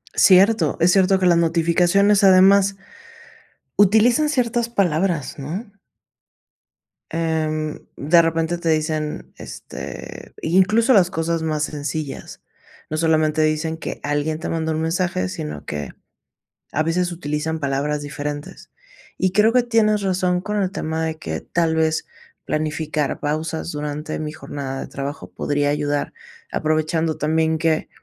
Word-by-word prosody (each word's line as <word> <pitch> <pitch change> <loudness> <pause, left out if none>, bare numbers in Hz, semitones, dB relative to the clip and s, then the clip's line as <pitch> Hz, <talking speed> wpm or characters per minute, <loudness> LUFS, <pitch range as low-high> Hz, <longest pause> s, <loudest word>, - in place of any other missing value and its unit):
Cierto, 190 -3 +5
es 170 +2 +4
cierto 195 0 +4
que 185 - +1
las 175 -1 +5
notificaciones, 175 +5 +3
además 195 +1 +6 1.0
utilizan 220 +9 +5
ciertas 240 -4 0
palabras, 175 - 0
¿no? 185 - -6 1.4
Em, 155 -2 -1 0.2
de 165 +5 +5
repente, 165 +1 0
te 170 - -1
dicen, 155 -1 -2
este, - - -9
incluso, 200 +9 +3
las 185 -5 +5
cosas 165 -1 -1
más 155 -2 -1
sencillas. 150 -1 -5 0.5
No 155 - -2
solamente 155 -1 +2
dicen 155 +1 0
que 165 - -6
alguien 145 +2 -1
te 160 - -5
manda 160 -1 -1
un 155 - -2
mensaje, 165 - -1
sino 75 -4 -6
que 75 -1 -5 0.8
a 155 - +1
veces 175 +2 0
utilizan 160 -1 -3
palabras 145 +1 -1
diferentes. 145 0 -6 0.5
Y 185 - +1
creo 210 +4 +4
que 250 -1 +4
tienes 220 -3 +2
razón 185 -2 0
con 210 +1 -2
el 190 -1 -1
tema 160 -4 -3
de 160 -1 -3
que, 80 - -4
tal 165 -1 0
vez, 160 0 +1 0.4
planificar 155 -1 -2
pausas 160 +3 -3
durante 150 +1 -4
mi 155 -1 -4
jornada 135 -3 -6
de - - -6
trabajo 140 +2 -6
podría 145 0 -1
ayudar, 145 0 -1 0.4
aprovechando 155 0 0
también 160 +1 +1
que, 160 -1 0
160 Hz, 135 wpm, -21 LUFS, 150-185 Hz, 1.4 s, además